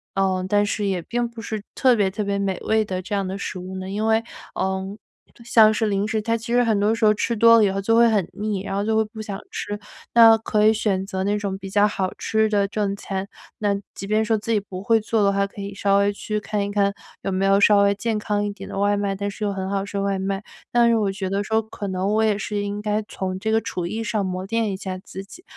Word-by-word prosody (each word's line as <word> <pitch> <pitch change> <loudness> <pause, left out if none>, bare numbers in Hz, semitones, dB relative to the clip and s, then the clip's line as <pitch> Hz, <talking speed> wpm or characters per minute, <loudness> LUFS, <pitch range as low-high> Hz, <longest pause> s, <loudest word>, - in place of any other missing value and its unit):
呃， 190 -1 +1
但 205 +1 +3
是 205 0 -2
也 190 -3 -1
并 240 +7 -2
不 230 -1 -9
是 220 -2 -5
特 255 -2 +4
别 205 -3 +2
特 210 +3 -3
别 200 0 -1
美 195 -2 -1
味 220 0 +2
的 185 -2 -3
这 185 - -7
样 195 -1 -1
的 190 +1 -4
食 185 - -5
物 185 +1 -7
呢？ 185 0 -6
因 210 +3 -2
为， 220 0 +3 0.3
呃， 190 +1 -2 0.5
像 220 -2 +6
是 220 0 0
零 200 0 0
食， 220 0 -1
它 230 +2 0
其 230 +1 -5
实 245 0 +4
很 220 -3 +2
多 210 +2 +2
时 225 - -3
候 210 - +7
吃 230 +3 -1
多 230 +1 +7
了 220 - +5
以 200 - +3
后， 195 +1 -2
就 225 +3 +2
会 235 0 +6
很 205 -6 +1
腻， 210 -2 -2
然 195 - -4
后 200 +1 -1
就 220 0 +1
会 220 - +4
不 220 +1 -12
想 200 -2 -5
吃。 205 0 -5 0.3
那 225 -1 +8
可 215 -1 +2
以 - - +7
选 205 -3 0
择 190 -1 -3
那 205 +1 +1
种 200 -2 -3
比 195 0 -9
较 205 +1 +4
好 190 -2 -2
吃 220 0 +1
的 200 -2 +2
正 200 -1 -1
餐， 195 -1 -4 0.3
那 205 -1 +1 0.2
即 - - -6
便 215 +2 +2
说 220 0 +1
自 220 +2 -4
己 220 - +3
不 190 -2 -8
会 225 +2 +4
做 220 0 +1
的 200 0 +3
话， 200 0 +1
可 200 - -13
以 200 0 -5
稍 200 0 +2
微 200 0 +2
去 210 +1 -3
看 210 -1 -2
一 200 - -3
看， 200 -1 +2 0.3
有 195 - -2
没 190 +1 0
有 195 0 +4
稍 205 0 +6
微 200 0 +4
健 220 +1 -1
康 205 -1 -1
一 205 - -2
点 205 - -10
的 - - -6
外 205 +1 +2
卖， 200 -1 -1
但 200 +1 -3
是 210 - -7
又 205 - 0
很 190 -1 -4
好 195 -1 0
吃 200 0 -5
的 195 - 0
外 200 -1 0
卖。 195 +1 -2 0.3
但 240 -1 +4
是 235 - +4
我 205 -3 +1
觉 195 0 -4
得 200 +1 0
说， 220 +2 +1
可 210 -1 -7
能 190 +2 -1
我 220 +1 +3
也 215 -2 +2
是 210 0 -3
应 205 0 -3
该 210 0 -1
从 185 -1 -4
这 220 +3 -1
个 220 - +4
厨 180 -5 -4
艺 220 +5 -3
上， 215 -2 -1
磨 185 0 -3
练 225 +1 0
一 190 - -4
下 185 -1 -5
自 190 0 -9
己， 325 - -14
205 Hz, 305 characters per minute, -23 LUFS, 195-220 Hz, 0.5 s, 那